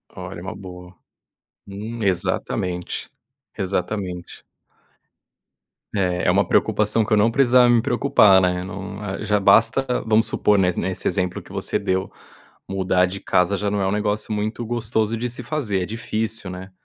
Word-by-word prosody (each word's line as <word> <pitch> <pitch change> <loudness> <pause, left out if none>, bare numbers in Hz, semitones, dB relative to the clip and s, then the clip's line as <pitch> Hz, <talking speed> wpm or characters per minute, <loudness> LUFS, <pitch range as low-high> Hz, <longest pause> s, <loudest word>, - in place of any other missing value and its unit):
Olha, - - -7
é - - -10
uma - - -6
boa. 90 -1 -11 0.7
Hum, 110 +4 -7
exatamente, 90 -1 -2 0.5
exatamente. 90 -1 -4 1.5
É 90 -2 0
é - - +5
uma - - +2
preocupação 115 - +2
que 115 - -7
eu - - +5
não 110 +3 +3
precisava 125 -1 +5
me 120 -1 +4
preocupar, 120 -6 +4
né, 90 -1 0
não 100 +1 -7 0.3
já 105 0 +2
basta 135 +6 +4 0.2
vamos 110 0 +3
supor, 105 0 +2
ne 90 -1 +3
nesse 95 +2 -3
exemplo 90 -2 -1
que - - -16
você - - -1
deu, 95 0 -1 0.6
mudar 95 -1 +1
de 95 +2 -6
casa 90 +2 +1
já 100 0 -2
não 105 - -1
é 95 - 0
um - - 0
negócio 105 +1 -1
muito 110 +3 -3
gostoso 115 -1 -1
de 120 +2 -3
se 120 - -2
fazer, 110 -12 -2
é - - -3
difícil, 110 -2 -3
né. 95 +1 -8
100 Hz, 160 wpm, -22 LUFS, 95-110 Hz, 1.5 s, é